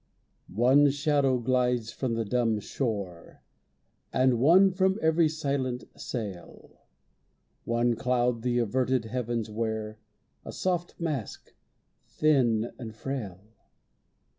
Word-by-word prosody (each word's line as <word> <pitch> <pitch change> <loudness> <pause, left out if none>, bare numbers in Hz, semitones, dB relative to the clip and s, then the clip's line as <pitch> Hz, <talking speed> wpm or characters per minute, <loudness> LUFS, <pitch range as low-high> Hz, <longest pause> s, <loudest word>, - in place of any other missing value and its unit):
One 135 +6 +5
shadow 140 -2 +1
glides 125 -2 0
from 120 -1 -2
the 115 -1 -1
dumb 115 -1 +1
shore, 100 -7 -5 0.7
And 130 -2 +2
one 180 +9 +6
from 190 +1 +1
every 160 0 +3
silent 140 -5 -2
sail. 105 -8 -7 0.9
One 120 0 +1
cloud 120 0 0
the 120 0 0
averted 125 +1 0
heavens 115 -2 -3
wear, 110 -1 -3 0.4
A - - -7
soft 175 -2 -2
mask, 150 -9 -4 0.5
thin 120 -7 +2
and 110 -3 -8
frail. 110 -8 -5
125 Hz, 105 wpm, -28 LUFS, 115-140 Hz, 0.9 s, one